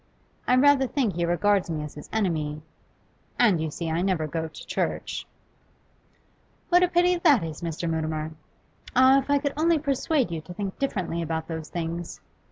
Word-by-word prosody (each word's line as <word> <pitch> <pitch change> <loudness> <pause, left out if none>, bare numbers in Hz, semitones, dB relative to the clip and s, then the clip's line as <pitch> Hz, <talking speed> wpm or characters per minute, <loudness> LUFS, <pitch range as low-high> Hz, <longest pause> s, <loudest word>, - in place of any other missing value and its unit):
I 250 - +5
rather 270 0 +5
think 245 -7 0
he 170 +1 -1
regards 190 +2 +2
me 155 -2 -2
as 150 - -7
his 150 - -11
enemy. 155 -8 -1 0.7
And, 205 -9 +4
you 160 - -1
see, 165 +3 -5
I 165 +2 0
never 185 -4 0
go 160 +1 -3
to 160 - -11
church.' - - -3 1.4
'What 355 0 +5
a 360 - +5
pity 355 +1 +3
that 295 - +4
is, 160 -2 -6
Mr. 170 0 -3
Mutimer! 155 -1 -2 0.6
Ah, 260 +2 +6
if 275 - -7
I 285 - +4
could 285 0 -2
only 325 +2 +3
persuade 280 - 0
you 165 -2 -3
to 175 +3 -11
think 195 -1 -5
differently 185 -11 -2
about 160 -1 -3
those 160 -2 -5
things! 170 0 -4
175 Hz, 175 wpm, -26 LUFS, 160-270 Hz, 1.4 s, Ah